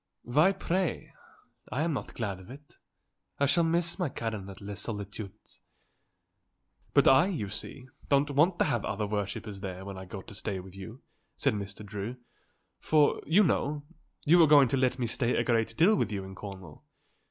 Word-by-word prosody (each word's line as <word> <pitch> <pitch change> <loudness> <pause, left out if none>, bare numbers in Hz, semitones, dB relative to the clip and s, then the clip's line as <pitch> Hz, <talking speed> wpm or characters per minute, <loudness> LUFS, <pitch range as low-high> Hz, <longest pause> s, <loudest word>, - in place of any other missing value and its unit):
"Why, 150 +10 +4
pray? 190 -2 -2 0.6
I 145 - 0
am 165 -1 0
not 135 - -5
glad 100 -5 -3
of 95 - -14
it. 145 +3 -14 0.6
I 140 - +4
shall 155 +5 +3
miss 170 +2 +1
my 175 -5 0
Karen 110 -6 -4
at 95 - -10
Les 100 0 -5
Solitudes." 105 -1 -7 1.4
"But - - +6
I, 135 +7 +6
you 125 - -3
see, 125 +5 -5 0.2
don't 145 +1 +3
want 160 +6 +3
to - - +3
have 120 - 0
other 105 +1 -2
worshippers 105 0 -4
there 95 -1 -6
when 100 -1 -7
I 95 - -8
go 95 0 -8
to - - -12
stay 100 -1 -3
with 95 0 -11
you," 110 +6 -10 0.3
said - - +2
Mr. 100 0 -6
Drew; 105 +4 -5 0.6
"for, 150 -2 +3
you 180 +8 +5
know, 150 -4 0 0.4
you 170 +3 +6
are 160 - +7
going 140 -4 +7
to 135 - +1
let 130 -1 +1
me 125 - -1
stay 120 +1 0
a - - +2
great 115 -2 0
deal 190 +7 +5
with 110 - 0
you 100 -2 -3
in 95 0 -9
Cornwall. 95 -5 -10
115 Hz, 185 wpm, -29 LUFS, 100-150 Hz, 1.4 s, are